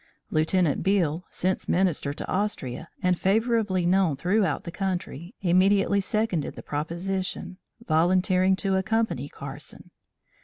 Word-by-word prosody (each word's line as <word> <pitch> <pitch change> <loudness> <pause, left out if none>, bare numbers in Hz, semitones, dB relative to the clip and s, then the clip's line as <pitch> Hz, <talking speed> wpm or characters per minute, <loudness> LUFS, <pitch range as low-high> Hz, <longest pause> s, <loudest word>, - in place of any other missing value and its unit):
Lieutenant 160 0 +2
Beale, 180 -4 +1
since 185 +1 -2
Minister 175 -6 +1
to 145 - -6
Austria, 170 -8 -2
and 180 -1 +2
favorably 210 -3 +1
known 180 -4 +3
throughout 190 +8 +1
the 170 - -6
country, 180 - -4
immediately 195 +2 +3
seconded 195 -6 -1
the - - -9
proposition, 180 +5 -3 0.3
volunteering 185 +3 +3
to 190 0 0
accompany 215 - 0
Carson. 140 +1 -9
185 Hz, 115 wpm, -26 LUFS, 165-195 Hz, 0.3 s, known